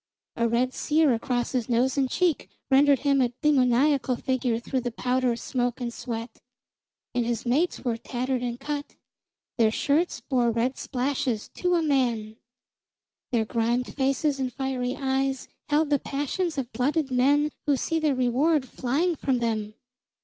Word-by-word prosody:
A 235 - +1
red 250 +3 +1
sear 305 -3 +2
across 240 +1 -1
his 250 -2 -1
nose 245 +2 +2
and 270 -2 +1
cheek 345 -1 0 0.2
rendered 275 -1 +5
him 280 -1 +3
a 245 -1 +1
demoniacal 265 -1 +3
figure 250 -2 -1
through 255 +2 -2
the 245 - -2
powder, 250 0 0
smoke 245 0 -2
and 240 -2 -3
sweat. 230 -1 -6 0.7
And 245 -1 +1
his 235 +1 -2
mates 290 +9 +1
were 240 -3 -1
tattered 250 +2 -2
and 240 -1 -3
cut, 290 +1 -5 0.6
their 225 -1 +5
shirts 295 +9 0
bore 245 -4 +1
red 235 +3 0
splashes 255 -3 -2
to 360 -1 0
a 335 - +2
man; 235 -7 0 0.9
their 230 -3 +1
grimed 235 +2 -1
faces 275 +1 0
and 260 -1 -1
fiery 260 -1 -2
eyes 270 -1 -1 0.2
held 295 0 +2
the 285 - +4
passions 290 +5 -2
of 255 -3 -4
blooded 280 +2 0
men 285 +4 +3 0.2
who 285 -2 +3
see 325 +5 -1
their 305 -3 +1
reward 260 +4 +2
flying 290 +9 0
from 265 -3 0
them. 215 -3 -2
255 Hz, 155 wpm, -26 LUFS, 240-285 Hz, 0.9 s, rendered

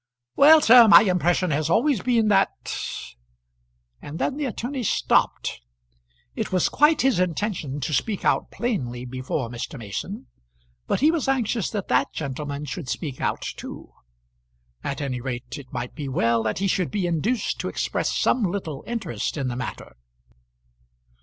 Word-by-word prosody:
"Well, 310 +2 +8
sir, 240 -3 +8
my 210 - +9
impression 180 -2 +1
has 150 +2 0
always 235 - +2
been 235 -3 +2
that 195 -1 +1 0.7
" - - -45
And 150 +2 -7
then 270 - -1
the 295 0 -2
attorney 255 +2 -4
stopped. 190 - +1 0.7
It - - -3
was 185 -1 +2
quite 300 +1 +4
his 260 -8 +3
intention 175 -5 -2
to 155 - -2
speak 205 +7 -1
out - - +2
plainly 125 - -3
before 130 +1 -3
Mr. 120 +4 -6
Mason, 130 - -6 0.6
but - - 0
he 305 +3 +5
was 330 -6 -1
anxious 245 -6 0
that 205 -3 -4
that - - +2
gentleman 145 0 -4
should 145 -1 -6
speak 145 -4 -4
out - - -1
too. - - -8 0.9
At 140 - -3
any 130 -3 -3
rate 125 0 -5
it 130 -3 -13
might 120 0 -5
be 145 -3 -5
well 115 -2 +2
that 110 -1 -2
he 195 - -1
should 185 -2 0
be 205 -3 -1
induced 175 +9 -1
to - - -3
express - - -1
some 255 - +1
little 175 -7 -3
interest 205 - -3
in 135 -3 -1
the 120 - -4
matter. 125 - -6
165 Hz, 160 wpm, -24 LUFS, -, 0.9 s, my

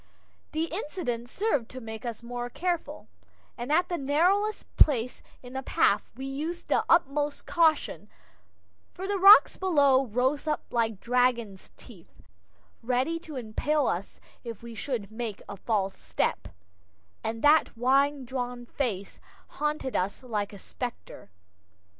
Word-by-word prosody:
The 315 +1 0
incident 305 - -4
served 290 - 0
to 255 - -8
make 225 +1 -7
us 235 0 -6
more 245 0 -4
careful, 345 +5 -3 0.5
and 245 +3 -5
at 350 +3 +3
the 345 - -2
narrowest 360 +10 +2
place 250 -5 +3 0.2
in 250 0 -10
the 265 - -3
path 210 -5 +2
we 265 - -5
used 310 +6 -5
the - - +3
utmost 295 -3 +2
caution, 325 -3 +1 0.9
for 370 - -5
the 400 -1 -1
rocks 395 +3 +8
below 280 -8 +3
rose 260 +7 0
up 305 - 0
like 225 -4 0
dragon's 240 -5 0
teeth, 190 -9 -16 0.6
ready 255 +7 0
to 315 -3 -10
impale 265 +5 0
us 185 -1 -3 0.2
if 230 -2 -8
we 235 0 -8
should 225 -2 -4
make 220 -2 -5
a 200 - -6
false 195 -1 -1
step - - -1 0.8
and 225 +1 -3
that 295 -4 +4
white 275 +3 +2
drawn 245 -1 -4
face 215 -7 -3 0.3
haunted 300 -3 -2
us 195 +7 -1
like 210 -5 -2
a 200 - -10
specter. 230 - -7
255 Hz, 140 wpm, -28 LUFS, 230-300 Hz, 0.9 s, rocks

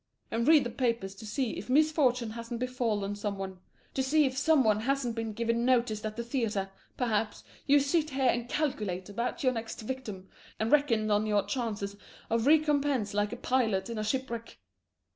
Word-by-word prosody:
and 230 +1 0
read 310 -2 +7
the 240 - -3
papers 230 -5 -1
to 205 +2 -10
see 245 +2 -1
if 205 - -9
misfortune 265 -5 +3
hasn't 230 +1 -6
befallen 230 -5 -1
some 205 -1 -3
one, 190 -1 -6 0.3
to 265 - 0
see 295 +3 +3
if 260 -1 -1
some 310 0 +4
one 215 -2 +3
hasn't 250 0 -1
been 225 -1 -3
given 230 +2 0
notice 235 -4 +2
at 215 0 -4
the 235 - -3
theatre, 225 -6 -1 0.3
perhaps; 220 -4 -1 0.2
you 290 +1 +6
sit 300 +3 +1
here 265 -1 -1
and 240 -1 +1
calculate 210 - -2
about 235 - -3
your 255 -1 +3
next 225 -1 -5
victim 215 -6 -6 0.3
and 220 +1 0
reckon 230 -8 +3
on 210 +1 +2
your 205 -2 +2
chances 205 -3 -3 0.4
of 230 +2 +1
recompense 290 -8 +3
like 205 0 0
a 240 - -5
pilot 230 -6 0
in 225 - -3
a - - -1
shipwreck. 235 0 -3
235 Hz, 185 wpm, -30 LUFS, 210-265 Hz, 0.4 s, read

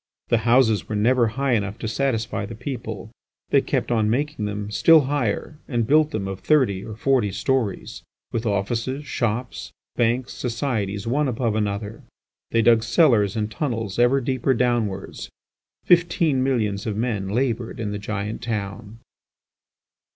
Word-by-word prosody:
The 120 - +3
houses 115 -4 +3
were 110 - -2
never 120 +3 +3
high 135 +4 -1
enough 100 -2 -1
to 110 - -4
satisfy 115 -3 -1
the 115 - -8
people; 115 -3 -6 0.4
they - - +5
kept - - -2
on 110 -2 +2
making 140 -1 -1
them 105 0 -4
still 160 +8 +6
higher 145 +1 -2
and 120 -4 0
built 150 +4 +4
them 105 -10 -3
of 95 0 -5
thirty 125 -11 +2
or 110 - -7
forty 120 -3 +1
storeys, 120 0 -2 0.3
with 115 - -2
offices, 115 +8 -2
shops, 120 -1 -3 0.3
banks, 120 +1 +1
societies 115 -5 -2
one 140 +5 +1
above 120 -2 -1
another; 105 0 -3 0.5
they 115 -1 +2
dug 115 -1 +5
cellars 115 - +3
and 110 -1 -2
tunnels 115 -5 -3
ever 120 +3 +4
deeper 130 +1 0
downwards. 115 -5 -1 0.6
Fifteen 170 -5 +3
millions 110 -7 0
of 105 -2 -2
men 110 -5 -2
laboured 120 0 -1
in 105 -3 -3
the 105 - -4
giant 105 +2 -4
town. 110 -1 -5
115 Hz, 150 wpm, -23 LUFS, 105-130 Hz, 0.6 s, still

